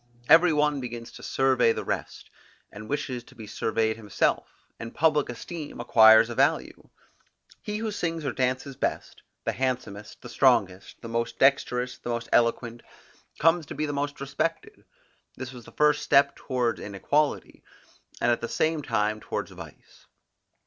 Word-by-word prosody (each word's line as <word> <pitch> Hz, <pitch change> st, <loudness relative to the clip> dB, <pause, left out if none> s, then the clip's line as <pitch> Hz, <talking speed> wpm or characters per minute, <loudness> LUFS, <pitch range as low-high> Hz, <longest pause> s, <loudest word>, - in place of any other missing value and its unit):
Every 165 Hz, +3 st, +7 dB
one 150 Hz, -1 st, +1 dB
begins 120 Hz, -1 st, -7 dB
to -, -, -13 dB
survey 130 Hz, -3 st, +2 dB
the -, -, -5 dB
rest, -, -, -5 dB, 0.4 s
and 110 Hz, +1 st, -10 dB
wishes 130 Hz, -4 st, -3 dB
to -, -, -18 dB
be 110 Hz, -, -10 dB
surveyed 110 Hz, +1 st, -1 dB
himself; 105 Hz, -4 st, -2 dB
and 115 Hz, 0 st, -8 dB
public 150 Hz, -3 st, +2 dB
esteem 150 Hz, +5 st, -7 dB
acquires 110 Hz, -2 st, +7 dB
a 120 Hz, -, -5 dB
value. 140 Hz, +6 st, 0 dB, 0.7 s
He 210 Hz, -1 st, -4 dB
who 220 Hz, 0 st, -3 dB
sings 165 Hz, -5 st, -3 dB
or 140 Hz, -, 0 dB
dances 130 Hz, +1 st, -2 dB
best; -, -, -4 dB, 0.2 s
the -, -, 0 dB
handsomest, 120 Hz, -5 st, -4 dB
the -, -, -8 dB
strongest, 100 Hz, -8 st, +1 dB
the -, -, -6 dB
most 115 Hz, 0 st, -3 dB
dexterous, 125 Hz, -2 st, +1 dB
the -, -, -7 dB
most 115 Hz, -1 st, -3 dB
eloquent, 120 Hz, 0 st, +1 dB, 0.6 s
comes 165 Hz, -1 st, +2 dB
to -, -, -7 dB
be 155 Hz, +2 st, -1 dB
the 145 Hz, -, -3 dB
most 145 Hz, 0 st, -3 dB
respected: 145 Hz, +4 st, -4 dB, 0.5 s
this 130 Hz, 0 st, -7 dB
was 120 Hz, -2 st, -12 dB
the -, -, -13 dB
first 150 Hz, 0 st, +2 dB
step 140 Hz, 0 st, +3 dB
towards 125 Hz, -3 st, -2 dB
inequality, 140 Hz, +9 st, -1 dB, 0.6 s
and 120 Hz, -, +2 dB
at 120 Hz, -, 0 dB
the 115 Hz, -, -4 dB
same 160 Hz, -1 st, 0 dB
time 110 Hz, -5 st, -1 dB
towards -, -, -5 dB
vice. -, -, -14 dB
130 Hz, 160 wpm, -26 LUFS, 115-145 Hz, 0.7 s, Every